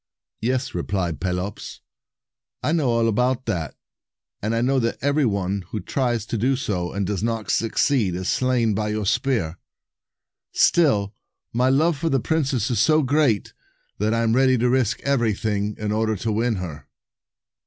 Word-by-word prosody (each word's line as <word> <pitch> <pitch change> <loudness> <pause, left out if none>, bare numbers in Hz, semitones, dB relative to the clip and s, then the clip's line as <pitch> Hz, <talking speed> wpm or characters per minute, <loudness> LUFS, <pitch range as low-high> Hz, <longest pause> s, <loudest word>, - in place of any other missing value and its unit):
"Yes," 130 +3 -1
replied 90 -3 -2
Pelops, 90 +2 -4 0.8
"I - - +1
know 155 -6 +1
all 115 -1 +2
about 125 +3 +1
that; 80 -6 -3 0.7
and 110 +2 -1
I 115 - +1
know 135 +2 +2
that 115 -1 -1
every 145 0 +2
one 100 -1 -1
who 105 - -4
tries 120 +2 -1
to 115 - -3
do 130 +5 +2
so, 90 -9 -2
and 100 0 -2
does 100 0 -2
not 110 -4 -2
succeed, 115 - +1
is 90 +1 -4
slain 125 -4 +1
by 105 +1 -1
your 105 -1 -2
spear. 115 - 0 0.9
Still, 105 - +3 0.4
my 125 +2 +2
love 150 +3 +2
for 165 +1 0
the 135 - +2
princess 135 -5 0
is 120 - 0
so 155 -1 +4
great, 130 -6 +1 0.5
that 105 +2 +1
I 115 0 +1
am 115 0 +2
ready 130 0 +4
to 120 +1 +2
risk 130 -5 +1
anything 105 -5 0
in 105 -1 -3
order 110 0 0
to 110 +3 -2
win 115 +2 +1
her." 85 -6 -7
115 Hz, 165 wpm, -23 LUFS, 100-130 Hz, 0.9 s, so